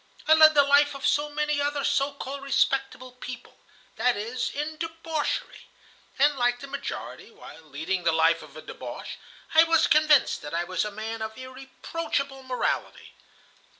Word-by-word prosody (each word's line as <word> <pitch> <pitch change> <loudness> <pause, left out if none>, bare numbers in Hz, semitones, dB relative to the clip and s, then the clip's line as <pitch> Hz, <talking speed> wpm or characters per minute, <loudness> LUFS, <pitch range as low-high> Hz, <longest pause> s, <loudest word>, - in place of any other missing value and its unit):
I 315 - +7
led 315 -1 +7
the 285 - +7
life 285 +1 +4
of 275 - -5
so 295 0 +2
many 300 0 -1
other 290 0 -1
so 280 0 +1
called 280 0 -7
respectable 270 -1 0
people,—that 250 -1 -5
is, 230 +4 -3
in 300 +2 -4
debauchery. 325 -2 -4 0.5
And 285 +1 +3
like 245 0 +1
the 275 - -8
majority, 275 - -7
while - - -13
leading 160 +5 -4
the 165 - +3
life 160 +1 +3
of - - -13
a - - -10
débauché, - - -8 0.4
I 320 +1 +8
was 330 0 +3
convinced 305 -2 +4
that 145 +2 -6
I 170 - 0
was 185 0 -2
a - - -3
man 220 +2 -6
of 220 0 -5
irreproachable 270 +2 -5
morality. 255 -1 -3
275 Hz, 160 wpm, -26 LUFS, 235-295 Hz, 0.5 s, I